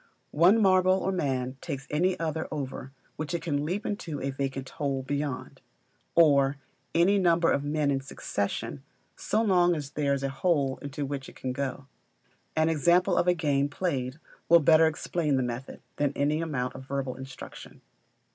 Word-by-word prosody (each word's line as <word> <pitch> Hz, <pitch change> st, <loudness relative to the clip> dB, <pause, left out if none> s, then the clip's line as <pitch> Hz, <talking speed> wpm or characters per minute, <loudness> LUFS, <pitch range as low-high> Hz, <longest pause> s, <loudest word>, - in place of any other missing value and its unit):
One 180 Hz, +8 st, +5 dB
marble 185 Hz, -2 st, +5 dB
or 190 Hz, 0 st, -1 dB
man 130 Hz, -7 st, -1 dB
takes 135 Hz, -1 st, -5 dB
any 180 Hz, +5 st, +1 dB
other 160 Hz, -1 st, -2 dB
over 135 Hz, -2 st, -5 dB, 0.3 s
which 155 Hz, +2 st, -3 dB
it 165 Hz, -, -4 dB
can 145 Hz, -4 st, -1 dB
leap 185 Hz, +7 st, -2 dB
into 165 Hz, -8 st, -4 dB
a 135 Hz, -, -2 dB
vacant 135 Hz, -1 st, -3 dB
hole 135 Hz, -2 st, -2 dB
beyond; 140 Hz, 0 st, -4 dB, 0.5 s
or 140 Hz, -4 st, +5 dB, 0.4 s
any 190 Hz, +4 st, +4 dB
number 170 Hz, -2 st, +3 dB
of 140 Hz, -, +1 dB
men 145 Hz, 0 st, 0 dB
in 135 Hz, -1 st, 0 dB
succession, 135 Hz, +2 st, -4 dB, 0.3 s
so 220 Hz, +2 st, 0 dB
long 175 Hz, -4 st, +4 dB
as 145 Hz, -3 st, -5 dB
there 145 Hz, -1 st, +1 dB
is 135 Hz, -, -5 dB
a 135 Hz, -, 0 dB
hole 135 Hz, -2 st, 0 dB
into 145 Hz, 0 st, -4 dB
which 135 Hz, -1 st, -5 dB
it -, -, -16 dB
can 130 Hz, -1 st, -4 dB
go. 135 Hz, 0 st, -4 dB, 0.7 s
An 160 Hz, 0 st, +3 dB
example 175 Hz, +4 st, +3 dB
of -, -, +2 dB
a 180 Hz, -, +4 dB
game 145 Hz, -3 st, +1 dB
played 140 Hz, -4 st, -2 dB, 0.3 s
will 170 Hz, 0 st, +8 dB
better 160 Hz, +1 st, +6 dB
explain 155 Hz, -1 st, -1 dB
the 130 Hz, -, +1 dB
method, 125 Hz, +2 st, -5 dB, 0.2 s
than 145 Hz, -2 st, +1 dB
any 150 Hz, +3 st, +1 dB
amount 130 Hz, -6 st, -2 dB
of 130 Hz, -, -9 dB
verbal 135 Hz, -2 st, -3 dB
instruction. 130 Hz, -1 st, -10 dB
145 Hz, 175 wpm, -28 LUFS, 135-170 Hz, 0.7 s, will